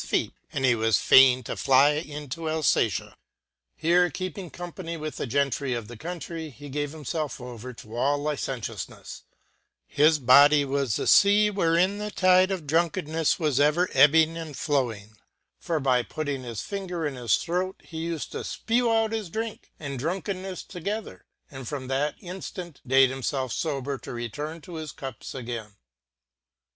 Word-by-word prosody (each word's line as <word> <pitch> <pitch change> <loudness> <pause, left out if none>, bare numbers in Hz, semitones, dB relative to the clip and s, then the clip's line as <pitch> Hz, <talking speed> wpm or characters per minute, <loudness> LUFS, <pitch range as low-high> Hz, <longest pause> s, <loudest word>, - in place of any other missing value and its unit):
feet, - - -1 0.2
and 135 - -1
he 130 - +5
was 110 -2 +2
fain 130 -1 +6
to - - -4
fly 135 +2 +5
into 150 +1 -4
Alfatia. 150 - +1 0.6
Here 175 +2 +3
keeping 185 +2 -5
company 175 -1 -7
with 155 -1 -5
the - - -3
Gentry 140 0 0
of 115 -3 -5
the 120 - -9
countrey, 165 +3 -6
he 145 +1 -11
gave 145 +1 -2
himfelf 155 0 -4
over 125 0 -8
to 115 -1 -11
all 140 +4 +2
licentioufnefle: 130 - -5 0.6
His 155 - +4
body 145 +2 +6
was 135 -5 0
the - - -2 0.2
lea 210 +1 +4
wherein 185 +1 +2
the 210 0 -3
tide 185 -2 +4
of 185 -5 -3
drunkenneffe 160 0 +1
was 150 -5 +1
ever 150 +5 +3
ebbing 160 +4 +5
and 160 -4 -7
flowing 120 -8 -1
• - - -25 0.5
for 165 -2 -1
by 130 -3 +2
putting 145 +1 -4
his 120 -3 -5
finger 180 -5 -4
in 145 - -2
his 120 -4 +1
throat 180 +2 -2
he 160 - -10
u 170 -1 -2
fed - - -6
to - - -5
fpew 240 +1 0
out 225 -1 +2
his 220 -5 -3
drink 220 +4 -5
and 140 -4 -5
drunkennefle 185 - -4
together, 200 +5 -5 0.2
and 135 -3 -8
from 140 -3 -4
that 145 +3 -1
inftant 180 -3 -7
date 135 0 +5
himfelf 130 -1 -2
fober 140 -3 -3
to - - -8
return 145 +8 -5
to 175 0 -9
his 155 -2 -6
cups 135 -2 -8
again. 115 -5 -6
150 Hz, 165 wpm, -26 LUFS, 130-175 Hz, 0.6 s, fain